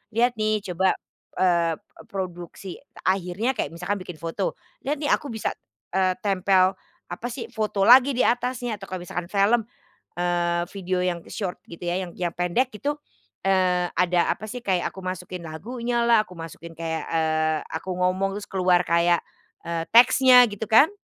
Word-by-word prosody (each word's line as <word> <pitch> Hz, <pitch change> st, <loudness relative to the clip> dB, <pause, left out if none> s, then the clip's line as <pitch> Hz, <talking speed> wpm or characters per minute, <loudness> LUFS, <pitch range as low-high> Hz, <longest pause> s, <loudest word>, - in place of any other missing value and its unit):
"Lihat 240 Hz, 0 st, +2 dB
nih 215 Hz, -1 st, +1 dB
coba, 185 Hz, +2 st, +2 dB, 0.4 s
eee 170 Hz, -3 st, +2 dB
eee, -, -, -19 dB
produksi," 185 Hz, -2 st, -6 dB, 0.2 s
akhirnya 190 Hz, +5 st, 0 dB
kayak 250 Hz, -, -3 dB
misalkan 180 Hz, +4 st, -2 dB
bikin 180 Hz, -2 st, -8 dB
foto, 165 Hz, -, -3 dB, 0.3 s
"lihat 290 Hz, -, +1 dB
nih 290 Hz, -, +1 dB
aku 290 Hz, -, +1 dB
bisa, 225 Hz, -5 st, -2 dB, 0.4 s
eee, 185 Hz, 0 st, +2 dB
tempel, 190 Hz, -1 st, +3 dB, 0.4 s
apa 240 Hz, -, -4 dB
sih, 235 Hz, -1 st, -6 dB
foto 215 Hz, -4 st, -1 dB
lagi 255 Hz, +5 st, +7 dB
di 250 Hz, -, +2 dB
atasnya," 245 Hz, -2 st, 0 dB
atau 195 Hz, -, -9 dB
kalau 185 Hz, -1 st, -5 dB
misalkan 175 Hz, 0 st, -5 dB
film, 210 Hz, +4 st, +2 dB, 0.5 s
eee, 175 Hz, -1 st, +1 dB
video 185 Hz, -2 st, -2 dB
yang 175 Hz, -2 st, -2 dB
short 190 Hz, -4 st, -4 dB
gitu 170 Hz, +1 st, -8 dB
ya, 175 Hz, +2 st, 0 dB
yang 180 Hz, -, -6 dB
yang 175 Hz, -2 st, -2 dB
pendek 180 Hz, +9 st, 0 dB
itu, 280 Hz, +7 st, -2 dB, 0.6 s
eee, 185 Hz, -2 st, +3 dB
ada 180 Hz, 0 st, +2 dB
apa 215 Hz, 0 st, -9 dB
sih 250 Hz, -, -5 dB
kayak 190 Hz, -7 st, 0 dB
aku 190 Hz, -1 st, -10 dB
masukin 180 Hz, -1 st, -5 dB
lagunya 235 Hz, +9 st, -3 dB
lah 230 Hz, -2 st, +4 dB
aku 180 Hz, -, -13 dB
masukin 165 Hz, 0 st, -9 dB
kayak, 160 Hz, 0 st, -4 dB
eee, 155 Hz, -1 st, +1 dB
aku 180 Hz, +3 st, -4 dB
ngomong 185 Hz, +2 st, 0 dB
terus -, -, -11 dB
keluar 180 Hz, -2 st, +3 dB
kayak, 170 Hz, 0 st, +2 dB, 0.4 s
eee, 165 Hz, -1 st, -3 dB
teksnya 250 Hz, +1 st, +8 dB
gitu 205 Hz, +2 st, -5 dB
kan. 225 Hz, -, +6 dB
185 Hz, 170 wpm, -24 LUFS, 175-220 Hz, 0.6 s, teksnya